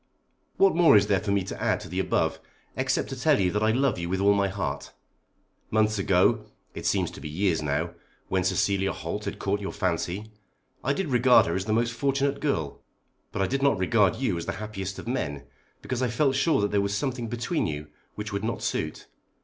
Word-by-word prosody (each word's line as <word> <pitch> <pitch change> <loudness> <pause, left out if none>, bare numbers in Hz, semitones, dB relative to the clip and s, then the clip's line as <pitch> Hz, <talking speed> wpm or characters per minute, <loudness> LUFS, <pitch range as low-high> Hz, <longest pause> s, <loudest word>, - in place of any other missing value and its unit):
What 195 -3 +4
more 170 -10 +7
is 100 - +4
there 100 -2 +2
for 105 - -5
me 100 -1 +2
to 95 - -7
add - - +1
to - - -8
the - - -3
above - - 0 0.4
except - - 0
to - - -4
tell - - +3
you 90 -2 +2
that 105 - -1
I 110 - +3
love 130 -4 +1
you 85 0 -3
with 95 +1 -1
all 100 +1 +5
my 100 -1 +2
heart. 75 -8 -4 0.8
Months 110 -1 +2
ago, 95 -1 +3 0.3
it - - -4
seems - - +1
to - - -11
be 75 - -6
years 85 0 0
now, 70 -1 -1 0.3
when 95 -1 0
Cecilia 95 +1 +1
Holt 100 +6 -5
had 100 0 -4
caught 100 +1 -1
your 100 - -4
fancy, 95 +2 -2 0.5
I 140 - +1
did 190 +2 -2
regard 125 0 +5
her 85 - -1
as 95 +1 -2
the 110 - 0
most 115 +1 +1
fortunate 140 +2 0
girl. 80 - -2 0.5
But 95 - -1
I - - +3
did 135 +4 -1
not 140 -6 +3
regard 100 +1 +3
you 105 -11 -1
as 85 - -7
the - - -1
happiest 100 -2 -5
of - - -8
men, 75 - -2 0.4
because 130 -1 -3
I 130 - +2
felt 135 +4 +1
sure 140 -1 +2
that 100 - 0
there 100 -1 +2
was 100 0 -1
a - - 0
something 125 0 -2
between 120 - -1
you 75 -1 -4 0.3
which 105 0 -5
would 100 +1 -2
not 115 0 -2
suit. - - -2
105 Hz, 225 wpm, -26 LUFS, 95-120 Hz, 0.8 s, more